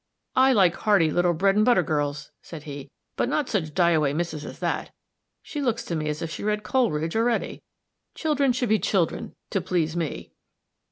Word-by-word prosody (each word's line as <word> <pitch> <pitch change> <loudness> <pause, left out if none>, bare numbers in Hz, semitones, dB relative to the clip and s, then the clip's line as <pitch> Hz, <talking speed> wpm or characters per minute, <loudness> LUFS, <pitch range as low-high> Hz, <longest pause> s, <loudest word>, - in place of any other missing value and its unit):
"I 265 +1 +5
like 190 -7 +4
hearty 195 -7 +3
little 175 0 +2
bread 195 +4 +2
and 210 - +4
butter 235 -6 +4
girls," 145 -2 -2
said 160 -3 -10
he, 140 -2 -8 0.3
"but - - 0
not 290 -1 0
such 160 -8 -2
die 175 -2 +4
away 150 -4 +2
misses 155 -2 -3
as - - -8
that. - - -2 0.5
She 295 - -5
looks 240 -4 -1
to 170 - -3
me 155 -1 -2
as 150 +1 -3
if 165 - -4
she - - -6
read 210 0 -1
Coleridge 165 - 0
already. 230 +1 0 0.5
Children 290 -4 +1
should 245 -1 -1
be 215 0 +3
children, 180 -3 -1 0.2
to 195 - 0
please 170 -2 -1
me." 165 -3 -4
175 Hz, 190 wpm, -25 LUFS, 155-225 Hz, 0.5 s, I